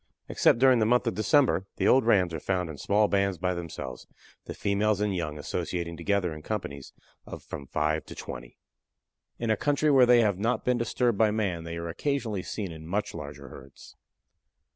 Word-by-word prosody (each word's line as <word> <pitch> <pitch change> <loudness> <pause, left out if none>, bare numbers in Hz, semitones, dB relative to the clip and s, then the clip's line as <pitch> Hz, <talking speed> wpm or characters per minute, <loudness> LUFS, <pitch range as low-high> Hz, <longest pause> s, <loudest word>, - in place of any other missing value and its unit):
Except - - +3
during 130 -1 +5
the 110 - +2
month 125 +2 +3
of 115 - 0
December 110 - +2
the - - 0
old 130 -3 +4
rams 90 -6 +3
are 80 - -3
found 90 -1 -2
in 75 - -10
small 105 +1 +2
bands 100 -2 +1
by 90 +2 -1
themselves, 85 -7 -7 0.4
the - - -7
females 100 0 +1
and 105 -2 0
young 75 -4 -3
associating 85 +4 -4
together 90 0 0
in 75 - -9
companies 75 -8 -5 0.4
of - - -8
from 70 - -8
five 75 +2 -1
to - - -9
twenty. - - -8 0.8
In 115 -1 -1
a - - +3
country 145 +5 +1
where 130 -3 +6
they 120 -1 +6
have 100 -4 +1
not 115 +2 -1
been 125 -1 +2
disturbed 120 -1 0
by 110 -1 +5
man 95 -6 -2
they 85 0 -5
are 85 0 -5
occasionally 110 - -2
seen 100 -1 -5
in 80 -1 -10
much 100 +5 -2
larger - - -8
herds. 70 0 -14
100 Hz, 195 wpm, -27 LUFS, 85-115 Hz, 0.8 s, where